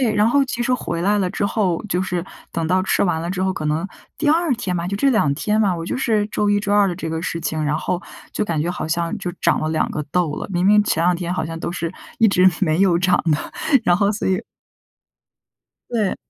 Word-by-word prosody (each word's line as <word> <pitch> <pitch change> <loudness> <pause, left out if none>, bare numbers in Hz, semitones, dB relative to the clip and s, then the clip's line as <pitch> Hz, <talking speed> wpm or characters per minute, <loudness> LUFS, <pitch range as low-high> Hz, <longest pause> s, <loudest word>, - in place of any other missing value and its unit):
对， 235 -5 +2
然 210 +1 +4
后 280 +3 +3
其 245 -2 -3
实 255 - 0
回 170 -8 -3
来 205 +3 +2
了 185 - +1
之 - - -2
后， 190 -6 0
就 180 -1 0
是 180 -2 -2 0.3
等 165 -1 -2
到 185 +1 +2
吃 190 - +1
完 175 -4 +1
了 170 - -3
之 185 0 -2
后， 190 - +1
可 170 - -5
能 160 +5 0 0.3
第 305 - 0
二 325 0 +3
天 195 -6 -3
吧， 170 0 -2
就 200 - -2
这 275 +7 +2
2 215 - +2
天 210 +8 0
吧， 195 -4 +2
我 165 - -5
就 - - -2
是 220 -5 +1
周 210 -1 0
一 205 0 +2
周 205 0 -1
二 205 -1 +5
的 180 - -2
这 165 -2 -5
个 160 - -2
事 170 - -3
情， 155 -1 -2
然 150 0 +1
后， 175 +2 -2 0.3
就 - - -1
感 165 -6 -1
觉 170 - -1
好 175 - -4
像 170 +4 -1
就 180 -2 -4
长 - - +2
了 155 - -1
2 160 - 0
个 150 - -3
痘 175 -4 +1
了， - - -5
明 175 0 0
明 210 +1 +6
前 165 - +1
2 180 0 +3
天 175 0 -3
好 180 - -1
像 165 0 -6
都 170 +1 -4
是 170 0 -3 0.3
一 225 - +5
直 185 -1 +5
没 165 -1 +2
有 180 -3 +4
长 180 -1 +3
的， 150 - +3 0.5
然 175 - +4
后 200 +2 +2
所 210 - -2
以 190 -1 +2 1.5
对。 220 -5 0
185 Hz, 270 characters per minute, -21 LUFS, 170-210 Hz, 1.5 s, 明